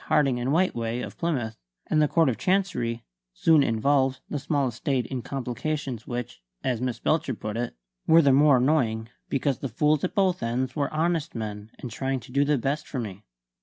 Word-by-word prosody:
Harding 135 -4 +3
and 120 +2 -1
Whiteway, 120 -9 +1
of - - -10
Plymouth 130 -10 -2 0.3
and 155 - +2
the 150 - +4
Court 165 +1 +3
of 115 -5 0
Chancery, 125 -11 0 0.3
soon 160 -3 +5
involved 135 +2 +2
the 150 - -1
small 140 -1 0
estate 125 +1 -1
in 130 -2 -4
complications 135 -1 -4
which 120 - -5 0.2
(as 125 -3 0
Miss 125 -2 -1
Belcher 155 -1 0
put 105 0 -5
it) 120 +1 -3 0.3
were 165 +1 +7
the 140 -2 +5
more 145 0 +6
annoying 120 -5 +1 0.2
because 135 -1 0
the 135 - -3
fools 150 +5 +2
at 185 - -2
both 190 -3 +2
ends 125 +3 -1
were 145 -2 -1
honest 160 -1 0
men 105 -1 -5
and 125 - -7
trying 135 +3 -2
to 115 - -13
do 140 +2 +3
the 145 0 +2
best 140 +5 -2
for 140 - -5
me. 100 -5 -5
135 Hz, 195 wpm, -26 LUFS, 120-150 Hz, 0.3 s, were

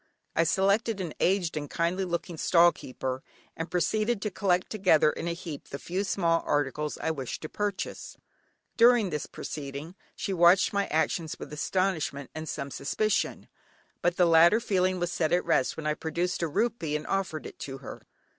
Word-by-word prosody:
I 165 - +3
selected 200 +4 +2
an 175 -5 -4
aged 185 -3 +1
and 145 -2 -4
kindly 175 +3 0
looking 170 0 -3
stall 170 +2 +5
keeper, 130 -2 -5 0.3
and 165 +1 -4
proceeded 215 +6 +1
to 210 - -2
collect 180 -2 0
together 185 -7 +4
in - - -5
a 170 - 0
heap 170 -4 -8
the 140 - -5
few 185 +6 -3
small 170 -3 +1
articles 145 +1 -1
I 160 - -1
desired 135 -5 -5
to 155 - -6
purchase. 205 -2 -4 0.6
During 235 -5 +5
this 150 -1 -3
proceeding 145 +3 -6 0.2
she 195 - -3
watched 175 +3 +5
my 200 0 +1
actions 160 +1 0
with - - -9
astonishment 155 -5 -1
and 155 0 -6
some 140 -1 -4
suspicion, 210 +11 -1 0.5
but 175 0 +1
the 180 - +5
latter 170 +5 +6
feeling 185 -4 +1
was 175 0 -1
set 160 -3 0
at 180 - +2
rest 130 - +1
when 160 - -6
I 150 - +2
produced 170 +3 -2
a 170 - +1
rupee 170 -3 -1
and 150 - -3
offered 190 -5 -2
it - - -10
to 135 -1 -6
her. 135 - -9
170 Hz, 180 wpm, -28 LUFS, 155-190 Hz, 0.6 s, latter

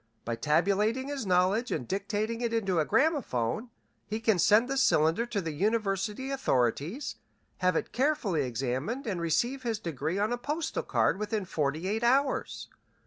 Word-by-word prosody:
By 115 - -1
tabulating 200 - +1
his 275 -7 -4
knowledge 185 +6 +2
and 120 - -2
dictating 210 +4 -2
it 235 -1 0
into 195 -6 +1
a 155 - +2
gramophone 245 - 0 0.4
he 215 +1 -3
can 220 -4 +2
send 215 +7 +5
the 270 - -2
cylinder 175 - +3
to 210 -4 -2
the 165 -3 -3
university 210 - -1
authorities, 165 - -1 0.4
have 185 -1 +2
it - - -1
carefully 250 - +1
examined, 130 - -2
and 185 -6 -2
receive 240 - 0
his 230 -3 -1
degree 165 -2 -3
on 210 +4 +1
a 245 - -3
postal 300 +6 -2
card - - +1
within 210 -1 -2
forty 155 +1 -1
eight 215 +3 -1
hours. 265 +3 +1
210 Hz, 160 wpm, -29 LUFS, 165-240 Hz, 0.4 s, send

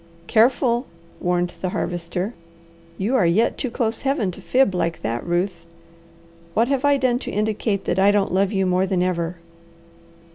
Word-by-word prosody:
"Careful!" 240 +3 +3 0.3
warned 175 0 0
the 185 - -1
Harvester. 180 +4 -3 0.6
"You 215 +7 0
are 205 - +4
yet 195 +7 +2
too 255 - -3
close 230 -2 -2
Heaven 270 -8 0
to - - -11
fib 260 -6 +2
like 170 -2 -2
that, 115 +2 -2
Ruth. 175 0 -1 0.9
What 230 +2 +3
have 275 -1 0
I 285 -1 +4
done 250 -2 +1
to - - -6
indicate 210 -1 -1
that 175 - 0
I 195 +1 +5
don't 205 -3 +2
love 195 +1 +2
you 195 -2 +1
more 185 +1 +2
than 185 -2 +1
ever?" 175 -1 -1
195 Hz, 170 wpm, -22 LUFS, 180-235 Hz, 0.9 s, I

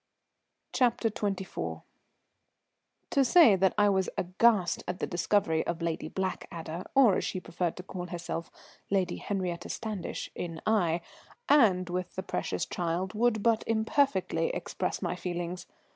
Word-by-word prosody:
CHAPTER 235 -3 +2
XXIV. 195 -3 -3 1.3
To 275 - +4
say 255 - +7
that 190 0 +2
I 205 - +5
was 190 -2 +2
aghast 185 0 +2
at 180 0 -2
the - - -2
discovery 175 -2 +1
of 170 -1 -2
Lady 165 -1 -2
Blackadder, 175 -3 -4
or, 245 -9 +6
as - - -1
she 185 - -2
preferred 175 -1 -3
to 180 - -7
call 180 -1 -6
herself, 170 -1 -5 0.4
Lady 195 -2 +1
Henriette 180 -4 -3
Standish, 215 -5 -4
in 165 -2 -5
Aix, 175 -6 +2 0.4
and 200 -11 +5
with 180 0 -4
the 190 - -3
precious - - -2
child, 180 +2 -2
would 220 -1 +1
but 230 -2 +3
imperfectly 225 - +1
express - - -3
my - - -1
feelings. 175 0 -4
185 Hz, 140 wpm, -29 LUFS, 175-215 Hz, 1.3 s, say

